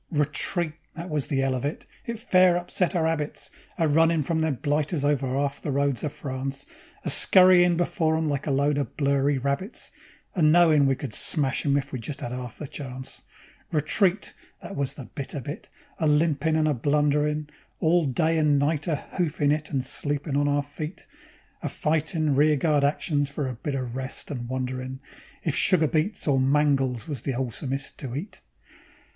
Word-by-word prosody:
Retreat! 150 +2 0 0.2
That 170 +1 -7
was 150 -3 -1
the 135 -2 0
'ell 135 -1 +1
of 125 - -3
it. 145 +2 -3 0.2
It 235 -1 -3
fair 185 -6 +4
upset 180 +1 -1
our 165 -2 +2
'abits, 160 -2 -2 0.3
A 165 - +2
runnin' 160 +1 +3
from 160 +3 0
them 160 -3 +1
blighters 145 +2 -1
over 145 -2 +1
'alf 140 +2 -1
the - - -4
roads 140 -2 0
of 150 - -1
France; 135 0 -5 0.4
A - - -2
scurryin' 180 -2 +6
before 160 -2 +1
'em 160 0 0
like 145 -1 -2
a - - +1
lot 140 +1 +2
of 140 - -4
blurry 140 0 +2
rabbits, 140 - -3 0.4
And 155 -5 +4
knowin' 160 -4 +5
we 135 - +2
could 130 -4 -6
smash 140 0 +1
'em 140 0 +3
if 135 -1 -3
we 130 - -4
just 135 +5 -5
'ad 120 - -4
'alf 125 -2 -6
a - - -3
chance. 130 -2 -7 0.5
Retreat! 175 +6 +1 0.3
That 195 - -7
was 140 -4 -2
the 135 - -8
bitter 140 +3 -5
bit, 140 +4 -7 0.3
a 160 - +2
limpin' 155 0 +2
and 155 -1 +2
a 150 - +2
blunderin'; 150 +2 +1 0.3
All 170 +1 +3
day 160 +5 +1
and 150 -2 +3
night 145 +2 0
a 160 - +1 0.2
hoofin' 150 -4 +1
it 155 +1 -1
and 130 -3 -1
sleepin' 145 +2 -1
on 145 0 +2
our 145 0 +1
feet; 150 +4 -7 0.6
A - - -2
fightin' 155 0 0
rear 150 +2 +4
guard 145 0 +2
actions 145 0 +1
for 140 -1 -3
a 130 - -3
bit 135 +4 -4
o' 130 - -1
rest, 130 +4 -6
and 120 -4 -5
wonderin' 130 0 -4 0.4
If 160 - 0
sugar 170 -4 +3
beets 160 +8 -1
or 135 -2 +3
mangels 135 -3 +2
was 145 -7 -4
the 135 0 -2
'olesomest 135 +2 -3
to 130 -3 -6
eat. 180 +9 -6
145 Hz, 185 wpm, -26 LUFS, 135-160 Hz, 0.6 s, scurryin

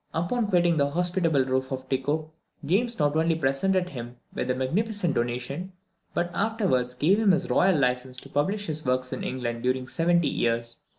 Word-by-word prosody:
Upon 205 +8 0
quitting 175 -4 +3
the 140 -1 +2
hospitable 170 -3 +1
roof 130 0 -1
of 130 0 -4
Tycho, 145 +4 -1 0.3
James 230 +9 +1
not 145 -1 +1
only 165 +1 +2
presented 175 +6 +1
him 120 -3 -7 0.2
with 125 - -3
a 125 - +2
magnificent 180 +7 0
donation, 125 +10 -3 0.4
but 175 0 0
afterwards 190 - 0
gave 175 +11 +3
him 210 -4 +4
his 180 0 0
royal 185 -3 +4
license 125 -1 0
to 135 - -12
publish 195 +10 0
his 155 -2 -3
works 130 0 0
in - - -4
England 120 -2 -3
during 130 +1 0
seventy 170 +3 +2
years. 115 0 -1
150 Hz, 175 wpm, -26 LUFS, 130-180 Hz, 0.4 s, him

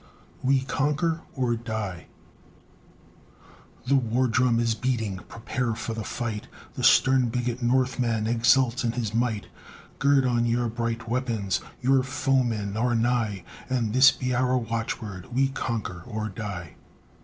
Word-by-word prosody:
"WE 135 0 +3
CONQUER 150 +5 0 0.2
OR 125 -3 +1
DIE" 110 -6 -5 1.8
The 130 - +1
war 125 0 +2
drum 120 0 +2
is 115 -1 +2
beating, 110 -4 -1
prepare 115 0 -2
for 115 - -4
the 110 -1 -4
fight, 110 -2 -4 0.3
The - - -5
stern 130 -2 +5
bigot 125 +1 -2
Northman 120 -2 +1
exults 120 +2 +3
in 115 -1 0
his 115 -4 -3
might; 115 -4 0 0.5
Gird 140 -1 +4
on 120 -1 +2
your 120 0 +1
bright 115 0 -3
weapons, 115 -6 -1 0.2
your 135 +1 +4
foemen 130 -6 0
are 120 +2 +1
nigh, 115 -5 0 0.3
And 120 -5 0
this 130 +2 +8
be 125 -1 -3
our 130 +1 +2
watchword, 115 -5 -4
"We 135 +1 +3
conquer 115 -9 -3
or 110 -2 -3
die." 95 -5 -6
120 Hz, 135 wpm, -26 LUFS, 110-130 Hz, 1.8 s, this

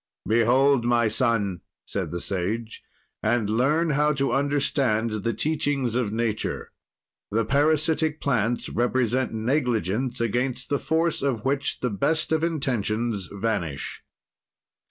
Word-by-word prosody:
"Behold, 120 +4 +4
my 120 -1 +3
son," 110 -5 0 0.2
said - - -3
the 85 - -4
Sage, 105 +6 -3 0.4
"and 110 -1 +1
learn 150 +8 +2
how 150 +1 +3
to 140 -2 0
understand 135 -6 +1
the 115 - +1
teachings 145 -3 0
of 120 -4 0
nature: 110 -1 -2 0.6
The 110 +1 0
parasitic 155 +3 +2
plants 120 -3 0
represent 125 +1 0
negligence 120 - 0
against 125 +2 -1
the 145 - +1
force 165 +1 0
of 130 -5 -1
which 140 +1 -1
the 125 - 0
best 155 +13 0
of 160 0 +2
intentions 120 - -1
vanish." 100 -9 -3
120 Hz, 120 wpm, -25 LUFS, 110-140 Hz, 0.6 s, Behold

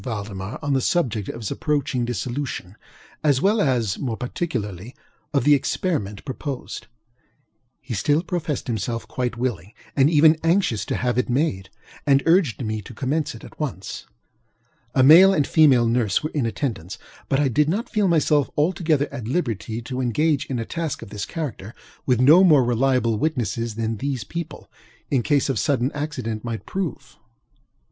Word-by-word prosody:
Valdemar 100 -3 -5
on 145 -1 0
the 135 - +2
subject 120 - 0
of 115 - -6
his 105 - -4
approaching 140 -5 -1
dissolution, 120 -4 -4 0.5
as 145 -4 +3
well 205 +6 +2
as, 120 - 0
more 120 -5 -3
particularly, 120 - -4 0.4
of 140 - +1
the 150 - +6
experiment 135 - -1
proposed. 135 0 -6 0.9
He 130 -3 -6
still 145 - +1
professed 170 -5 -3
himself 115 0 -3
quite 125 -2 -3
willing 110 -6 -3 0.2
and 140 +1 +4
even 155 0 +5
anxious 165 - +1
to - - -2
have 125 -1 0
it 125 - -1
made, 120 -8 0 0.4
and 140 -1 +4
urged 165 - +3
me 110 0 -3
to 105 - -12
commence 145 +5 -1
it - - -12
at - - -13
once. 125 - -5 0.9
A 130 - +5
male 180 +8 +8
and 145 - +2
a - - -10
female 135 -7 +5
nurse 115 -2 +1
were 155 - -3
in 140 -6 0
attendance; 105 - -4 0.3
but 135 - +2
I 145 - +3
did 150 +4 +2
not 210 +8 -1
feel 210 -2 +1
myself 150 -4 +2
altogether 155 -2 +1
at 115 -3 -6
liberty 115 - -2
to 130 +1 -4
engage 145 +4 +1
in 130 - -3
a 115 - -3
task 165 -1 -4
of 100 - -12
this 105 -1 -5
character 125 - -6 0.3
with 125 -3 +3
no 155 +9 +7
more 150 -8 +6
reliable 120 -2 +1
witnesses 120 -6 -1
than 115 0 -2
these 135 -2 -3
people, 165 +7 -7 0.4
in 135 -3 +3
case 145 +2 +1
of 135 -6 0
sudden 135 -1 +1
accident, 130 -7 -4
might 115 -2 -5
prove. 160 -9 -5
130 Hz, 170 wpm, -23 LUFS, 115-150 Hz, 0.9 s, male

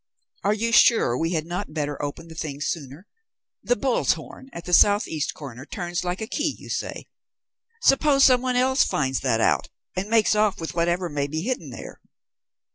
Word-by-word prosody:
Are 205 +2 +2
you 230 +2 -1
sure 225 - +5
we 165 +6 -1
had 160 -2 -1
not 170 -2 -5
better 145 -2 -3
open 145 +3 -5
the 165 - -11
thing 155 -3 -5
sooner? 145 +2 -5 0.6
The - - +1
bull's - - +1
horn 265 - -11
at 170 - -9
the 180 - -4
south 205 +4 +5
east 155 -2 -3
corner 130 -4 -9
turns 175 +2 -4
like 180 +2 -3
a - - -2
key, 300 +6 -2
you - - -12
say? - - -4 0.8
Suppose 275 0 +4
some 255 -2 +6
one 255 -1 -1
else 260 +2 +3
finds 130 -3 -1
that 115 -4 0
out - - +1 0.3
and 195 +3 -3
makes 225 -2 +4
off 210 -1 +1
with 165 - -5
whatever 175 +1 0
may 145 -3 -2
be 155 +3 -4
hidden 215 - -3
there." 120 - -10
175 Hz, 195 wpm, -24 LUFS, 150-220 Hz, 0.8 s, some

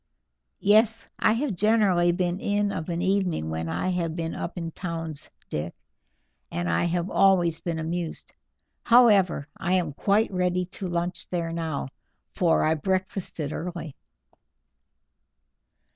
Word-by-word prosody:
"Yes, 220 +2 +4
I - - +4
have 245 0 -1
generally 195 -4 +3
been 175 +1 -1
in 205 0 0
of 160 -3 -4
an 170 +1 -1
evening 185 - 0
when 80 +1 -3
I 85 - -1
have 170 -3 -1
been 165 -1 -3
up 175 - -5
in 165 -1 -4
towns 165 -4 -4 0.2
Dick, 75 +3 -4 0.8
and 85 0 -2
I 85 - +1
have 175 +1 -1
always 175 -4 +4
been 170 -2 -2
amused. 165 +1 -4 0.5
However, 205 - +5
I 185 0 -1
am 175 -5 +1
quite 205 +9 +2
ready 180 -1 0
to 190 +1 -6
lunch 175 +1 -3
there 170 -2 -2
now, 160 -5 -3 0.4
for 170 -3 +2
I 155 - +3
breakfasted 185 -2 -2
early." 170 -4 -5
175 Hz, 135 wpm, -26 LUFS, 165-195 Hz, 0.8 s, However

